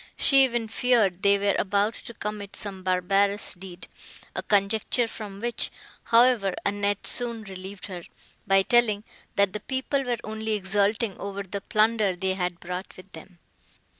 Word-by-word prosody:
She 275 -2 +5
even 240 -3 0
feared 215 -6 +2
they 200 -1 +4
were 200 0 +1
about 205 +3 +1
to 235 - -10
commit 210 -1 -6
some 195 -2 -6
barbarous 195 +2 +1
deed; 185 -1 -10 0.5
a - - -2
conjecture 210 +4 +2
from 205 -3 -8
which, 235 +2 +2 0.4
however, 230 -5 +4
Annette 205 0 -1
soon 235 -2 +4
relieved 190 0 -8
her, 180 -4 -8 0.4
by 195 0 +4
telling, 225 -3 +2 0.3
that 200 -2 +2
the 210 - -4
people 265 +4 -2
were 245 -2 -1
only 220 0 -3
exulting 205 +1 0
over 200 0 -5
the 195 +1 -6
plunder 215 -2 +2
they 190 +1 -1
had 180 -2 -3
brought 180 +2 -7
with 185 +1 -14
them. 175 +3 -13
200 Hz, 155 wpm, -26 LUFS, 190-225 Hz, 0.5 s, She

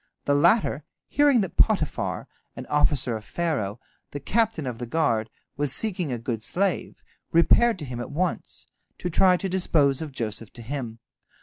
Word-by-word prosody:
The 145 - +2
latter, 165 - +3 0.2
hearing 290 -5 +3
that 190 - -5
Potiphar, 195 -9 +1 0.3
an - - -7
officer 145 -5 +2
of 110 - -6
Pharaoh, 125 - -2 0.3
the 145 - -6
captain 215 - 0
of 125 -3 -5
the 120 - -5
guard, 115 -6 +1 0.3
was 145 -2 +1
seeking 180 -7 -2
a 120 - -1
good 115 -1 -4
slave, 185 - -1 0.3
repaired 225 +7 +5
to 155 - -6
him 125 -2 -6
at 120 - -5
once, 175 +5 -3 0.3
to 180 - -4
try 180 +2 +5
to 195 - -3
dispose 160 -7 +2
of 155 -2 -5
Joseph 110 -3 -5
to 120 - -9
him. 120 -3 -5
145 Hz, 170 wpm, -25 LUFS, 120-180 Hz, 0.3 s, repaired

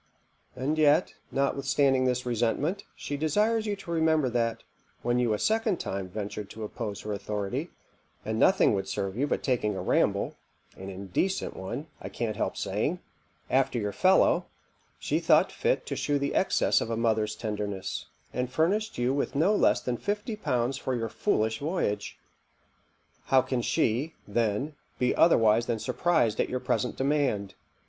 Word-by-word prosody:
And 140 +5 -1
yet, 155 +3 +4 0.2
notwithstanding 135 -1 +2
this 125 0 0
resentment, 125 - 0
she 145 - -4
desires 215 +9 +1
you 205 - 0
to 195 -3 -9
remember 160 -4 +2
that, 115 -1 -1 0.4
when 120 +1 +1
you 120 -2 +2
a 105 - +1
second 220 - +1
time 95 -1 -4
ventured 105 +1 -5
to 110 - -8
oppose 105 -1 -5
her 105 - -4
authority, 100 0 -3 0.6
and 110 +1 -2
nothing 190 - +5
would 95 -1 -1
serve 95 0 -3
you 140 +5 0
but - - -1
taking 115 -6 0
a - - -3
ramble - - +1 0.4
(an 95 +1 -8
indecent 100 - -2
one, 115 +10 -5 0.2
I - - -6
can't 115 -3 -3
help - - -2
saying) - - -1 0.5
after 130 -1 +2
your 105 -3 -1
fellow, 185 - +4 0.5
she - - -1
thought - - +4
fit - - 0
to - - -3
shew 145 -1 0
the 140 0 -1
excess - - +2
of - - -3
a 115 - -1
mother's 110 -2 +1
tenderness, 105 -3 -4 0.3
and 125 0 -1
furnished 205 +10 +1
you 125 +2 +1
with 140 - -1
no 180 +9 +3
less - - +3
than 125 -1 -2
fifty 210 - -3
pounds 130 - -1
for 130 - -2
your 115 -2 -2
foolish 110 +1 0
voyage. 145 - -2 1.1
How 130 -1 +4
can 130 -2 -1
she, 125 +7 0
then, 115 +6 0 0.2
be 125 0 +1
otherwise 115 -7 +4
than 120 - 0
surprized 140 -2 +1
at - - +1
your 130 - -1
present 125 0 -1
demand? 135 -8 0
125 Hz, 165 wpm, -28 LUFS, 110-150 Hz, 1.1 s, nothing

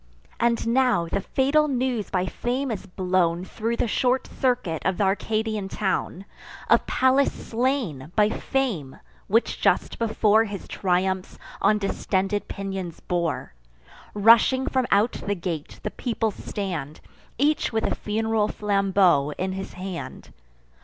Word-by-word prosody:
And 235 -1 +1
now 245 -7 +3
the 195 +4 -2
fatal 280 +8 +2
news 250 -5 -1
by 185 -1 0
Fame 250 +7 -2
is 200 -2 -5
blown 180 -2 0
Thro' 225 +4 -2
the 235 - 0
short 250 +3 +1
circuit 245 - -1
of 190 -2 0
th' - - -1
Arcadian 210 +1 0
town, 190 -1 -2 0.5
Of - - +4
Pallas 260 +2 +3
slain—by 215 - -1
Fame, 220 - -2 0.3
which 225 +4 +1
just - - +1
before 220 -1 +3
His 200 -2 -7
triumphs 185 0 -1 0.2
on 210 - +4
distended 195 0 -1
pinions 195 -3 -5
bore. 170 - -2 0.6
Rushing 230 +5 +5
from 260 -2 0
out 210 +4 +3
the 205 - -3
gate, 170 -4 -5
the 210 - -3
people 225 -2 -1
stand, 180 -9 -5 0.4
Each 295 +3 +2
with 220 -1 0
a - - 0
fun'ral 220 0 0
flambeau 195 -9 +2
in 185 +1 -2
his 190 +1 -6
hand. 185 -1 -7
205 Hz, 130 wpm, -25 LUFS, 185-235 Hz, 0.6 s, Rushing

